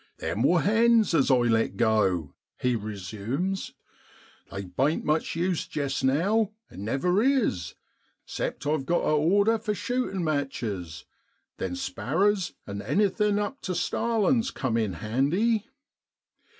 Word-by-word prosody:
1 - - -6
Them 100 +7 -2
wor 170 +7 +4
hens 225 0 +4
as 145 - +3
I 130 - +6
let 115 -4 +1
go,' 95 -9 +1 0.3
he 125 -1 +1
resumes, 110 - -4 0.4
' - - -27
they 100 - -5
bain't 135 - 0
much 155 +1 0
use 175 0 -1
jest 140 -3 -2
now, 195 +11 +2 0.2
and 95 - -8
never 160 - +1
is, 230 - +1 0.5
except 135 - -4
I've 145 -2 0
got 175 - +1
a - - +1
order 200 +9 +3
for 210 -1 -2
shootin' 245 -6 -2
matches; 110 - -3 0.5
then 90 -1 -3
sparrers 170 - 0
an' 100 0 -5
anything 205 - +1
up 210 +7 -3
tu 185 - -3
starlin's 230 +5 +1
cum 130 - -2
in 110 -4 0
handy. 155 - 0
150 Hz, 135 wpm, -27 LUFS, -, 0.5 s, I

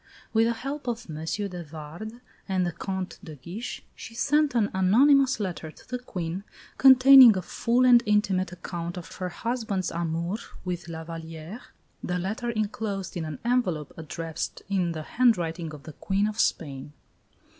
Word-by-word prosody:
With 225 0 +4
the 235 - +1
help 275 +4 -6
of 240 0 -3
M. 150 - -6
de 180 +2 -3
Vardes 165 +10 -9 0.3
and 185 -1 +1
the 175 - -1
Comte 190 +2 -5
de 160 -5 -9
Guiche, 180 - -7
she 230 - -10
sent 295 +1 +2
an 215 -3 +2
anonymous 260 +9 +4
letter 175 -6 -4
to - - -17
the 250 - -3
Queen, 180 -6 -5 0.4
containing 260 -4 +9
a 185 - -3
full 240 +7 +1
and 245 -1 +7
intimate 195 -3 +2
account 175 -1 -6
of 175 - -9
her 185 -1 -3
husband's 220 -2 -2
amour 170 +3 -2 0.3
with 175 -1 -4
La 160 -1 -6
Vallière 165 +5 -8 0.4
the 180 - -1
letter 215 +7 -3
enclosed 215 -3 -3
in 170 -2 -3
an 155 -2 -5
envelope 190 - 0
addressed 165 0 -5
in 180 -4 0
the 155 -1 -5
handwriting 175 -8 +1
of 150 -2 -10
the 155 - -9
Queen 200 +5 0
of 215 +1 -5
Spain. 140 -2 -1
190 Hz, 165 wpm, -27 LUFS, 165-230 Hz, 0.4 s, containing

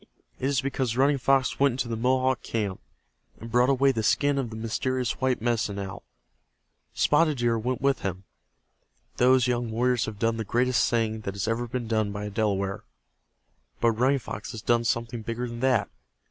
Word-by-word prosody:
It 130 - -1
is 140 -2 +1
because 130 -3 -2
Running 140 +1 +3
Fox 135 0 +2
went 140 -2 +4
into 125 -1 -2
the 115 - -2
Mohawk 130 +2 +1
camp, 105 -4 -3 0.6
and 115 0 -9
brought 125 +2 +4
away 135 0 +4
the 115 -4 -2
skin 140 +5 +2
of 125 -4 -2
the 110 - -8
mysterious 125 +3 -2
white 130 -4 0
Medicine 115 -4 0
Owl. 95 -1 -6 0.9
Spotted 150 -1 +3
Deer 120 -1 +1
went 125 +4 -2
with 135 -2 +2
him. 95 0 -4 0.9
Those 125 0 +4
young 120 -2 -1
warriors 120 +1 +1
have 110 -2 -6
done 115 +2 0
the 110 - -2
greatest 125 +4 +1
thing 110 -2 0
that 100 -2 -5
has 100 +1 -2
ever 115 +2 -1
been 120 -1 -4
done 110 -2 0
by 105 +1 -5
a - - -4
Delaware. 100 -2 -1 1.0
But 115 - +3
Running 130 +5 +2
Fox 110 -2 -7
has 110 -1 -7
done 120 0 +2
something 115 0 -1
bigger 115 +2 -4
than 120 0 -7
that. 125 -5 +2
120 Hz, 190 wpm, -26 LUFS, 110-130 Hz, 1.0 s, went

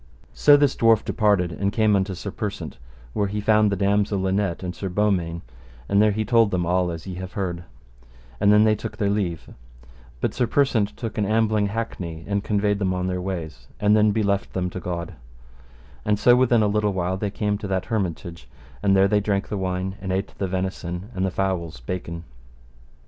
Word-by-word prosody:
So 145 -1 +6
this 145 -2 +2
dwarf 115 -2 +4
departed, 100 -5 +2
and 100 +3 -1
came 105 -3 +3
to 95 -1 -5
Sir 95 +3 -6
Persant, 95 - -5 0.3
where 100 - 0
he 105 +2 -3
found 105 0 +3
the - - +1
damosel 100 +1 +1
Linet 95 -1 -1
and 90 -1 -3
Sir 95 - -4
Beaumains, 90 -4 0 0.4
and 100 +1 +3
there 110 - +5
he 110 +1 -1
told 115 -1 +4
them 90 -3 -1
all 90 +1 +1
as 85 -1 -6
ye 95 - -6
have 95 0 -7
heard; 90 -3 -3 0.7
and 100 - +4
then 105 0 +6
they 110 0 +4
took 105 - -6
their 100 -1 +1
leave, 90 -6 -2 0.7
but - - -1
Sir 125 - 0
Persant 115 -6 +1
took 115 -2 -4
an 105 - +1
ambling 110 -1 +2
hackney 90 -7 -5
and 100 0 -1
conveyed 105 -1 +1
them 95 -2 0
on 90 0 -2
their 90 0 -2
ways, 90 -4 -5
and 105 0 +4
then 105 0 +4
beleft 100 -2 0
them 90 -1 -2
to 95 - -5
God; 85 0 -4 0.9
and 105 0 +1
so 120 +4 +5
within 125 -3 +4
a - - +3
little 105 0 +1
while 90 0 -1
they 105 +1 -2
came 105 0 -1
to 100 - -5
that 95 -1 -1
hermitage, 85 - -4 0.3
and 100 -1 +3
there 95 0 +5
they 105 +1 +2
drank 100 -1 -1
the - - -2
wine, 95 +1 -2
and 95 -1 -3
ate 95 +2 -2
the 95 - 0
venison 95 +1 -4
and 95 - -2
the - - 0
fowls 90 -7 -2
baken. 85 +4 -5
100 Hz, 205 wpm, -23 LUFS, 90-105 Hz, 0.9 s, So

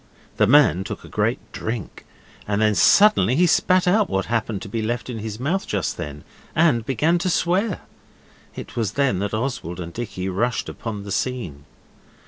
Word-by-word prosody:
The 105 - +4
man 130 -8 +5
took - - -7
a - - -11
great - - 0
drink, 110 -3 -6 0.4
and 100 0 0
then 105 0 +3
suddenly 165 - +5
he 175 +5 +4
spat 185 +2 +3
out 205 +2 +3
what 95 0 -1
happened 115 -3 -2
to - - -7
be 110 +2 -3
left 120 +3 -3
in 115 - -5
his 105 0 -6
mouth 170 +9 -1
just 100 -5 -2
then, 75 0 -7 0.3
and 155 -8 +3
began 150 +9 +1
to 185 +1 -1
swear. 185 +4 0 0.7
It - - -9
was 110 -4 -1
then 135 -9 +1
that 100 +2 -2
Oswald 110 - -3
and 85 -1 -6
Dicky 100 -6 -5
rushed 115 +6 -1
upon 105 -3 -6
the 100 - -7
scene. 95 - -3
115 Hz, 180 wpm, -22 LUFS, 100-150 Hz, 0.7 s, man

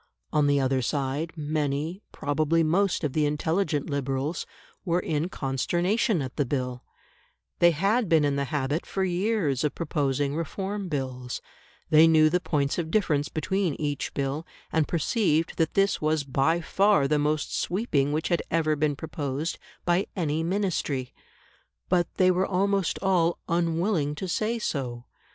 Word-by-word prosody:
On 150 -1 +3
the 145 0 +3
other 130 -1 +1
side, 140 +5 -1
many, 150 +3 -2
probably 155 +3 +1
most 180 +4 +1
of 145 -3 -1
the 150 -1 +2
intelligent 155 +1 0
Liberals, 140 +2 -2 0.4
were 175 -2 +1
in 160 0 -1
consternation 175 - 0
at 130 -1 -7
the 145 - +3
Bill; 125 -2 -3 0.8
they 175 - +7
had 195 +7 +1
been 160 -3 +4
in 140 -1 +1
the 140 0 0
habit 145 +3 -2
for 190 - -1
years 180 - 0
of 150 -1 0
proposing 145 -3 -1
Reform 195 +5 -3
Bills; 130 -4 -3 0.5
they 155 +1 +8
knew 155 -1 +5
the 180 - +2
points 145 -3 0
of 160 -2 -2
difference 155 -7 +1
between 185 0 -1
each 145 -2 -2
Bill, 140 +3 -2 0.3
and 160 -2 +2
perceived 165 -1 +1
that 160 -2 0
this 195 0 +2
was 155 -1 +1
by 140 +5 +1
far 195 -3 +3
the 150 +1 +2
most 150 0 0
sweeping 155 - 0
which 155 +2 -1
had 170 -3 +2
ever 155 -2 +2
been 150 -1 0
proposed 150 0 -4 0.3
by 175 +2 +2
any 160 -4 0
Ministry. 165 -8 -1 0.8
But 175 -2 +2
they 185 -1 +4
were 185 +1 +1
almost 195 -1 +1
all 175 -3 +2
unwilling 170 -2 0
to 190 - -4
say 220 +6 0
so. 125 - -3
155 Hz, 155 wpm, -26 LUFS, 145-180 Hz, 0.8 s, they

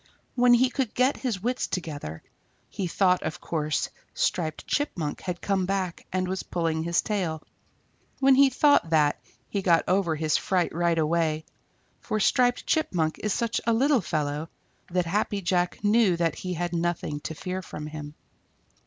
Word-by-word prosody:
When 245 -1 +5
he 255 +2 +3
could 260 -5 -2
get 255 +3 +3
his 225 -8 -3
wits 245 +2 -1
together, 145 - -5 0.5
he 190 - -3
thought 180 +1 +2
of 155 - -4
course 155 -3 -1 0.3
Striped 160 -4 -1
Chipmunk 175 - -2
had 180 -2 -4
come 190 -2 0
back 190 -3 -2
and 185 0 0
was 190 +1 -2
pulling 165 -2 -1
his 170 +1 +1
tail. 175 -7 -2 0.8
When 270 0 +5
he 275 +1 +6
thought 285 - +4
that, 150 -2 +2 0.3
he 200 - -2
got 170 -3 +4
over 180 -3 +2
his 155 0 +1
fright 180 -2 0
right 170 0 +1
away, 160 -1 +1 0.5
for 215 - -2
Striped 245 +4 +2
Chipmunk 170 - 0
is 210 - -1
such 235 +1 0
a 230 - +4
little 265 +2 +3
fellow 150 -2 -2 0.4
that 180 0 0
Happy 205 +3 0
Jack 180 0 0
knew 205 -4 +4
that 165 -1 +1
he 180 -1 -5
had 175 +1 -2
nothing; 170 -3 -1
to 160 +2 -6
fear 185 +3 -4
from 150 -4 -7
him. 150 -1 -7
180 Hz, 165 wpm, -26 LUFS, 160-210 Hz, 0.8 s, he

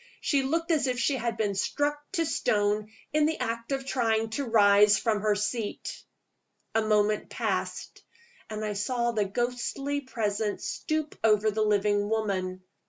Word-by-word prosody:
She 280 -2 +1
looked 330 +5 -1
as 305 -4 +2
if 250 -1 -1
she 270 +4 +1
had 235 -2 -2
been 205 -2 0
struck 290 +9 0 0.2
to 335 -3 +1
stone 210 -5 +1 0.2
in 305 0 +4
the 320 - -1
act 230 +2 -3
of 270 -1 -1
trying 225 -4 0
to 280 +5 -2
rise 205 -2 +6
from 215 0 0
her 210 -1 +2
seat. 210 +1 -3 0.7
A 225 - +3
moment 210 -1 +1
passed - - -3 0.5
and 215 0 -4
I 210 - -2
saw 235 +4 0
the 215 -3 0
ghostly 250 +6 -2
Presence 215 -5 -2
stoop 310 -3 -3
over 215 -1 +4
the 215 +1 -1
living 205 -1 +2
woman. 190 -4 -1
220 Hz, 160 wpm, -28 LUFS, 210-260 Hz, 0.7 s, rise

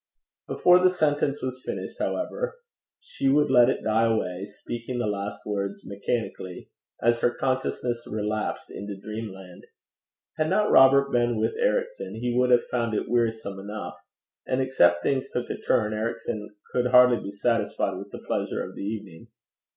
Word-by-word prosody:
Before 180 0 +5
the 185 0 +5
sentence 145 -5 0
was 130 0 -4
finished, - - -5
however, - - -2 0.4
she 310 - -2
would 145 0 +3
let 125 -1 +6
it - - -1
die 110 +1 +3
away, 95 -4 -2
speaking 120 +4 -6
the 120 - 0
last 100 0 -4
words 100 -1 -3
mechanically, 100 -3 -4 0.3
as 120 0 +3
her 120 - +3
consciousness 125 -2 -2
relapsed 105 0 -3
into 100 0 -6
dreamland. 95 -4 -8 0.7
Had 155 0 +1
not 210 +3 +2
Robert 140 +1 +6
been 120 -2 +1
with - - +1
Ericson, - - -1
he 120 +2 -2
would 125 0 +3
have 120 -1 +5
found 115 -3 -1
it - - -1
wearisome 110 -4 0
enough; 95 -4 -7 0.5
and 130 - 0
except 85 -10 +3
things 135 -1 0
took 125 - -3
a - - -4
turn, 110 -4 +1
Ericson 110 -1 -3 0.2
could 125 0 +1
hardly 125 -1 +6
be - - -6
satisfied 100 -2 0
with 100 +2 -8
the - - -10
pleasure - - -2
of - - -8
the - - -8
evening. 100 -5 -6
115 Hz, 160 wpm, -26 LUFS, 105-130 Hz, 0.7 s, let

